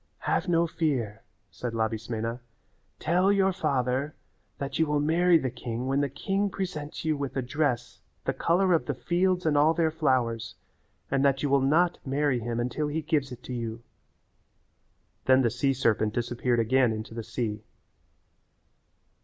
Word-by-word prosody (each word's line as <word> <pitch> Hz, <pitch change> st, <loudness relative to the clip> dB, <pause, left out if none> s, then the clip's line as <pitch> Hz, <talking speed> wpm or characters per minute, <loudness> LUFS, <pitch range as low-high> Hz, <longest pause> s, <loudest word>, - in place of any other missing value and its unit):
"Have 180 Hz, -, +1 dB
no 170 Hz, -1 st, +3 dB
fear," 130 Hz, -10 st, -1 dB, 0.3 s
said 120 Hz, -2 st, -5 dB
Labismena, 115 Hz, +1 st, -2 dB, 0.6 s
"tell 180 Hz, +4 st, +2 dB
your 195 Hz, -1 st, +3 dB
father 135 Hz, -2 st, -1 dB, 0.4 s
that 140 Hz, 0 st, -4 dB
you 160 Hz, -, +3 dB
will 150 Hz, 0 st, +1 dB
marry 170 Hz, +4 st, +4 dB
the 130 Hz, -5 st, -2 dB
king 120 Hz, 0 st, -5 dB
when 135 Hz, +2 st, +1 dB
the 140 Hz, -, 0 dB
king 195 Hz, +9 st, -1 dB
presents 170 Hz, -7 st, -5 dB
you 155 Hz, -1 st, +2 dB
with 140 Hz, -1 st, -4 dB
a 130 Hz, -, 0 dB
dress 125 Hz, -2 st, -1 dB, 0.2 s
the -, -, 0 dB
colour 180 Hz, +2 st, +2 dB
of 165 Hz, -, +1 dB
the -, -, -1 dB
fields 180 Hz, +1 st, +1 dB
and 155 Hz, -2 st, +2 dB
all 155 Hz, +3 st, +4 dB
their 165 Hz, -2 st, +2 dB
flowers 125 Hz, -7 st, 0 dB, 0.6 s
and 135 Hz, 0 st, +2 dB
that 135 Hz, 0 st, +2 dB
you 145 Hz, -, +1 dB
will 140 Hz, -1 st, +4 dB
not 165 Hz, +6 st, +3 dB
marry 140 Hz, -1 st, +1 dB
him 115 Hz, 0 st, -3 dB
until 125 Hz, +5 st, -1 dB
he 155 Hz, +2 st, -2 dB
gives 145 Hz, -4 st, 0 dB
it 125 Hz, 0 st, -9 dB
to 125 Hz, -, -6 dB
you." 115 Hz, -1 st, -4 dB, 1.4 s
Then 130 Hz, 0 st, +5 dB
the 115 Hz, -, +2 dB
sea 130 Hz, +4 st, +1 dB
serpent 110 Hz, -4 st, +1 dB
disappeared 120 Hz, 0 st, 0 dB
again 125 Hz, +1 st, +3 dB
into 110 Hz, 0 st, -5 dB
the 115 Hz, -, -4 dB
sea. 110 Hz, -2 st, -3 dB
135 Hz, 165 wpm, -27 LUFS, 120-160 Hz, 1.4 s, Then